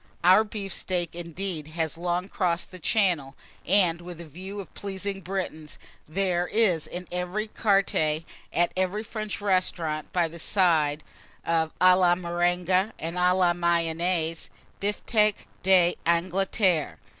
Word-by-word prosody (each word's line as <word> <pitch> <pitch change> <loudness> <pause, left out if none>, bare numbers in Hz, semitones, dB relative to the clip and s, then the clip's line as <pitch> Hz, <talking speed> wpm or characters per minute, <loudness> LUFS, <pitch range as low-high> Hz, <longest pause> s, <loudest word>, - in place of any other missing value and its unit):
Our 185 +5 +7
beef 205 -3 -6
steak, 175 -3 -2
indeed, 170 -2 -5
has 160 -1 -1
long 175 +2 -2
crossed 175 -3 -1
the 185 - -10
Channel; 170 -8 +1 0.3
and, 175 -3 +3
with 175 -1 -9
a 170 - -8
view 185 +6 -8
of 195 - -9
pleasing 200 0 -3
the - - -11
Britons, 175 -5 -5 0.3
there 180 0 0
is 190 -9 +2
in 180 0 -7
every 180 +5 -2
carte 200 -3 +1 0.6
at 175 +1 +1
every 185 +3 -1
French 215 -1 -4
restaurant, 180 -6 -1
by 175 -2 +1
the 170 +1 -10
side 160 -6 +2 0.4
of 160 -1 +1
à 185 0 +7
la 180 -1 +4
Marengo, 175 +2 +1
and 165 +2 -5
à 180 0 +3
la 180 -2 +3
Mayonnaise, 170 -1 0 0.3
bifteck 210 +1 +1 0.2
d'Angleterre. 180 -1 +2
180 Hz, 135 wpm, -26 LUFS, 170-195 Hz, 0.6 s, Our